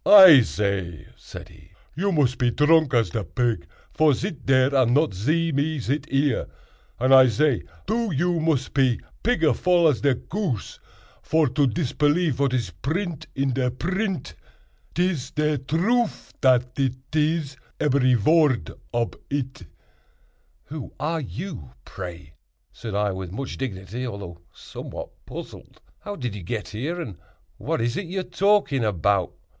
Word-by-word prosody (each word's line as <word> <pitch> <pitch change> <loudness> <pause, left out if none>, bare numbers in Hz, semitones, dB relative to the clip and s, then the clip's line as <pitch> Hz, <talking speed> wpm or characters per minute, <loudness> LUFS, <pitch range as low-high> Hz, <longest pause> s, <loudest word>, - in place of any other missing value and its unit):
"I 190 -8 +10
zay," 90 -3 -2
said - - -11
he, 80 +4 -19 0.2
"you 195 +7 -1
mos 145 -7 +2
pe 125 -1 +1
dronk 150 +2 +3
as 115 -7 +2
de 110 - -2
pig, 115 +7 -1 0.3
vor 155 -3 +4
zit 155 - -5
dare 130 +1 +4
and 130 -2 +3
not 150 -3 +2
zee 155 - 0
me 150 +2 0
zit 140 +4 -2
ere; 135 -2 +1 0.5
and 130 +2 +3
I 130 -1 +8
zay, 140 +1 +2 0.2
doo, 225 0 -1
you 170 +3 0
mos 155 -5 +1
pe 130 -4 +2 0.3
pigger 165 -10 +2
vool 175 -2 +3
as 140 - -1
de 140 -2 +3
goose, 160 - -4 0.4
vor 160 -3 +2
to 140 +3 +2
dispelief 150 +3 +1
vat 140 -1 +1
iz 120 -8 -1
print 160 - -4
in 135 -1 0
de 125 0 0
print. 185 - -3 0.6
'Tiz 175 -7 0
de 150 -1 +1
troof—dat 140 - 0
it 130 +2 -2
iz—eberry 140 -3 +1
vord 145 +2 +3 0.2
ob 120 -1 -1
it." 130 - -4 1.0
"Who 150 -3 -8
are 160 +2 -1
you, 135 - -7
pray?" 85 -5 -8 0.4
said 110 -4 -6
I, 105 0 +1
with 95 -2 -6
much 130 +7 -5
dignity, 115 0 -5
although 100 -7 -7
somewhat - - -8 0.2
puzzled; - - -10 0.2
"how 205 - -6
did 125 - -4
you 105 - -7
get 105 +5 -4
here? 145 +12 -4
and 110 - -6 0.4
what - - -2
is 120 +1 -1
it 190 - -4
you 190 +2 -2
are - - -6
talking 180 - +2
about?" 100 -2 +1
135 Hz, 150 wpm, -24 LUFS, 115-160 Hz, 1.0 s, I